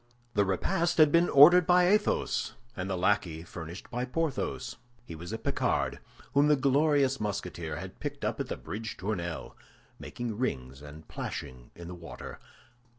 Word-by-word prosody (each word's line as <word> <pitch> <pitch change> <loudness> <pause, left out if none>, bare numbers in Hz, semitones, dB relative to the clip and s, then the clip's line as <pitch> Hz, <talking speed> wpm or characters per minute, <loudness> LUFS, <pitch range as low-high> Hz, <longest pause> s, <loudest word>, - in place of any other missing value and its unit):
The 100 - +3
repast 170 - 0
had 155 -2 +6
been 170 +2 +4
ordered 160 +5 +8
by 180 0 +5
Athos, 210 +2 +1 0.2
and 95 0 -4
the 95 - -1
lackey 90 -4 +1
furnished 85 +1 -9
by 125 0 -2
Porthos. 145 +3 -2 0.3
He 85 - -8
was 85 +2 -8
a - - -2
Picard, - - -1 0.3
whom 145 +1 +5
the 150 - +5
glorious 140 0 +2
Musketeer 90 -6 -4
had 95 +4 -8
picked - - -4
up - - -2
on - - -2
the - - -4
Bridge 110 0 -6
Tournelle, 85 -4 -4 0.4
making 120 -3 -5
rings 65 - -3
and 75 +2 -11
plashing 60 -1 -6
in 85 -1 -9
the 90 - -7
water. 85 -2 -9
105 Hz, 160 wpm, -29 LUFS, 85-145 Hz, 0.4 s, ordered